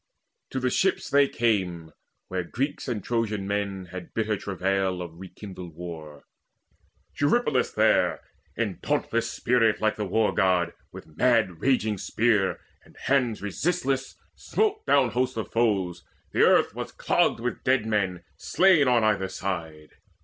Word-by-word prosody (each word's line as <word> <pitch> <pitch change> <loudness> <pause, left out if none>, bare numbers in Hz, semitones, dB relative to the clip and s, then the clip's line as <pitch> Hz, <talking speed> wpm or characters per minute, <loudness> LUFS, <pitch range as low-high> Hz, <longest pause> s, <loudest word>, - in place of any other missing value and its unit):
To 130 - -3
the 125 -1 0
ships 190 +7 0
they 140 0 +5
came, 95 -8 -1 0.4
where 95 -1 -2
Greeks 135 - -3
and 110 -6 -3
Trojan 110 -4 -1
men 100 -2 -3
Had 90 -2 -9
bitter 110 -1 0
travail 95 -1 -1
of 85 -1 -8
rekindled 95 -3 -10
war. 80 -4 -9 1.0
Eurypylus 145 - +2
there, - - +2 0.4
in - - -2
dauntless - - -1
spirit 115 -3 +2
like 110 0 0
The 105 -2 -2
War 110 +3 +1
god, 90 -3 +2 0.2
with - - -10
mad 110 -7 +2
raging 110 -6 +1
spear 110 -3 +1 0.2
and - - -21
hands 125 -7 0
Resistless, 135 - -1 0.2
smote 425 0 -1
down 130 -4 +4
hosts 125 +2 -1
of 110 - -4
foes: 95 -7 0 0.3
the - - +1
earth - - +4
Was - - -6
clogged - - +1
with 120 +1 -4
dead 130 -4 +2
men 95 -5 -1
slain 180 -7 +4
on 120 -2 +3
either 105 -3 +2
side. 80 -6 -5
105 Hz, 140 wpm, -26 LUFS, 95-125 Hz, 1.0 s, they